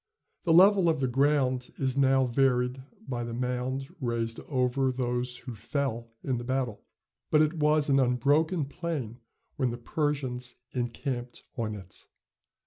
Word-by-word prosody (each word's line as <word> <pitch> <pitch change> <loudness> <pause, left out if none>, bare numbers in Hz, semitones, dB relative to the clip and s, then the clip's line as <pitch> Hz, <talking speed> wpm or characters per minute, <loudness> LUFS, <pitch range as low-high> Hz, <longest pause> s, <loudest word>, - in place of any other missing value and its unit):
The 170 - +3
level 190 0 +7
of 160 -3 +1
the 130 - +1
ground 130 -1 +1
is 130 -1 0
now 135 -1 +4
varied 125 0 +1 0.3
by 120 -2 -2
the 115 0 -4
mound 125 +2 -2
raised 115 -2 -1
over 130 -1 +1
those 125 -1 -2
who 125 - -8
fell 115 +1 -3
in 130 -3 -1
the - - -6
battle, 125 -3 -2 0.5
but 150 - +5
it 155 +2 +1
was 150 0 +3
an 135 -1 +4
unbroken 145 +6 +2
plain 140 -7 -4 0.4
when 130 -3 +1
the 120 - -4
Persians 125 -2 -2 0.2
encamped 120 0 -3
on 110 -3 -2
it. 95 -2 -12
130 Hz, 145 wpm, -29 LUFS, 120-140 Hz, 0.5 s, level